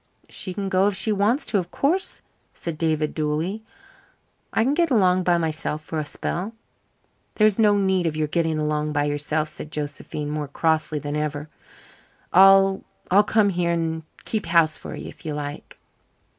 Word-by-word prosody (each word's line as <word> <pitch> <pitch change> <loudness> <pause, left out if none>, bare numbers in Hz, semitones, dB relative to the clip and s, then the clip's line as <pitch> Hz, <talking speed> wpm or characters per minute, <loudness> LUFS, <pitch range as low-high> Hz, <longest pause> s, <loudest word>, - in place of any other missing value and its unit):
"She 185 - -5
can 200 -1 -3
go 190 +1 +3
if 205 - 0
she 195 +3 +1
wants 210 +7 +1
to, 205 - +1
of 175 -1 -5
course," 350 - -1 0.3
said 165 -3 -6
David 155 -2 0
dully. 155 +7 -2 0.9
"I 225 - +2
can 265 +4 +2
get 335 +1 +2
along 185 -7 +3
by 175 -1 +2
myself 155 -2 -2
for 160 0 -4
a 150 - -3
spell." 190 +8 -4 0.8
"There's 215 -1 +3
no 210 -2 +5
need 190 -3 +1
of 155 - -2
your 155 -1 0
getting 160 0 0
along 150 0 -1
by 145 -1 +1
yourself," 145 +1 -1
said 155 0 -9
Josephine, 150 0 -5
more 150 -1 -3
crossly 155 +1 0
than 145 0 -4
ever. 150 0 -3 0.8
"I'll 195 +1 +6 0.3
I'll 200 +3 +6
come 210 -1 +3
here 175 -2 0
and 160 -1 -1 0.2
keep 215 -5 -2
house 165 -2 +4
for - - -7
you - - -7
if - - -12
you 155 -3 -4
like." 145 0 -7
165 Hz, 175 wpm, -23 LUFS, 150-195 Hz, 0.9 s, I'll